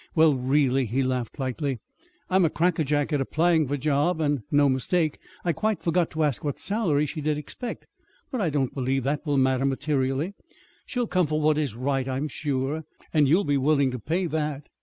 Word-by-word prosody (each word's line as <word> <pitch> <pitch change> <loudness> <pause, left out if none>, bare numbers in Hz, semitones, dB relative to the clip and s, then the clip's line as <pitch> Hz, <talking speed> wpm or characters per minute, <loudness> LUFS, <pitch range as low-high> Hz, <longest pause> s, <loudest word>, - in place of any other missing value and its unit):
"Well, 160 -2 +6
really," 135 0 +2
he 130 +5 0
laughed 130 0 -2
lightly, 135 0 -2 0.5
"I'm 185 0 +3
a 165 - +4
crackerjack 155 -3 +1
at 145 - +2
applying 160 +2 +2
for 145 - -1
a - - -3
job, 150 +4 +1
and 145 -4 +1
no 145 -2 +4
mistake! 150 +4 0 0.3
I 170 - +2
quite 215 +6 -1
forgot 170 0 +1
to 160 0 -1
ask 145 -5 0
what 145 -2 -2
salary 180 -9 +1
she 150 +2 -5
did 150 0 0
expect. 190 - -6 0.5
But 255 - -2
I 180 - +1
don't 140 -4 -1
believe 135 0 -1
that 140 +2 -1
will 145 -1 +2
matter 130 0 +2
materially. 135 +4 0 0.5
She'll 245 -2 -1
come 185 -6 +1
for 155 +1 0
what 155 0 +2
is 140 -8 -2
right, 135 +1 -1
I'm 135 +3 -2
sure; 145 +2 -2 0.3
and 150 -3 +4
you'll 170 +8 +4
be 145 -5 +1
willing 140 -1 +2
to 125 - -5
pay 170 - -1
that." 150 -3 -3
145 Hz, 200 wpm, -26 LUFS, 135-160 Hz, 0.5 s, Well